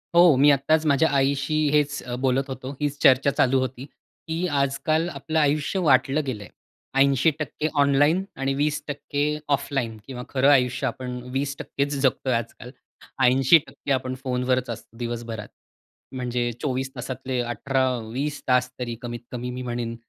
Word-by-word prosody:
हो, 170 -3 +7
मी 145 +2 +6
आत्ताच 155 +3 +2
माझ्या 150 +2 +3
आईशी 140 +2 +1 0.2
हेच 145 -1 +1
अ, 120 0 -5
बोलत 135 +1 +1
होतो, 130 0 -6
हीच 145 -1 -1
चर्चा 135 +2 +5
चालू 130 +1 +4
होती. 130 0 -4 0.4
की 160 - -2 0.2
आजकाल 140 +4 +1
आपलं 155 +2 -2
आयुष्य 150 +5 +1
वाटलं 135 +3 +3
गेलंय. 105 -7 -5 0.5
80% 145 +3 +2
ऑनलाईन 145 +6 +3 0.2
आणि 135 0 0
20% 145 0 -2 0.3
ऑफलाईन 125 -5 -3
किंवा 125 -2 -6
खरं 135 +1 +3
आयुष्य 125 -3 +3
आपण 125 -1 -5 0.2
20%चं 140 +1 -2
जगतोय 130 -1 +1
आजकाल. 115 +1 -4 0.5
80% 135 +4 +3
आपण 130 -1 0
फोनवरच 125 -1 0
असतो 115 0 -8
दिवसभरात. 115 -3 -5 0.7
म्हणजे 125 -1 -1
24 135 -1 -2
तासातले 130 0 -4
18-20 130 +2 -1
तासतरी 125 -1 0
कमीत-कमी 120 +1 -6
मी 125 +1 -5
म्हणेन. 120 -1 -3
135 Hz, 130 wpm, -24 LUFS, 125-145 Hz, 0.7 s, हो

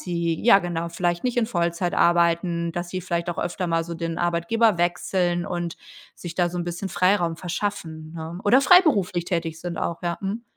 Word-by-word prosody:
sie 170 -2 -2
ja, 235 -5 +8
genau, 170 -2 -3
vielleicht 175 0 -1
nicht 250 -1 -1
in 230 -2 +2
Vollzeit 175 -3 -1
arbeiten, 170 0 +2
dass 175 +1 -4
sie 185 +1 -4
vielleicht 170 0 -2
auch 170 - -7
öfter 180 0 -2
mal 165 0 +1
so 170 0 -6
den 165 0 -4
Arbeitgeber 175 +6 +2
wechseln 175 0 0
und 175 -2 -4 0.4
sich 170 -1 -7
da 175 -1 +2
so 175 +1 -5
'n 175 - -2
bisschen 175 +3 -4
Freiraum 175 -2 +1
verschaffen, 170 -3 -4
ne? 165 +2 -7
Oder 245 +6 +5
freiberuflich 255 - +4
tätig 165 -2 -3
sind 175 -2 -5
auch, 170 - -3
ja. 175 -1 -2
Mhm. 205 +4 -3
175 Hz, 195 wpm, -24 LUFS, 170-185 Hz, 0.4 s, ja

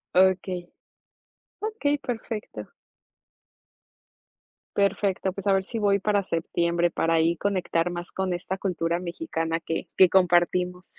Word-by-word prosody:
Okey. 185 -1 +2 0.9
Okey, 425 -10 0
perfecto. 230 -4 -5 2.1
Perfecto, 195 -1 +1
pues, 195 +2 -6
a 195 - +5
ver 190 0 +2
si 225 +4 -5
voy 200 -1 +3
para 205 0 +2
septiembre, 170 0 0
para 165 +1 +1
ahí 165 +1 +2
conectar 180 -3 0
más 175 0 -6
con 190 -1 -1
esta 180 +2 -3
cultura 170 -3 -1
mexicana 165 - -3
que 165 - -3
que 185 -2 +7
compartimos. 180 0 +2
185 Hz, 120 wpm, -26 LUFS, 170-200 Hz, 2.1 s, que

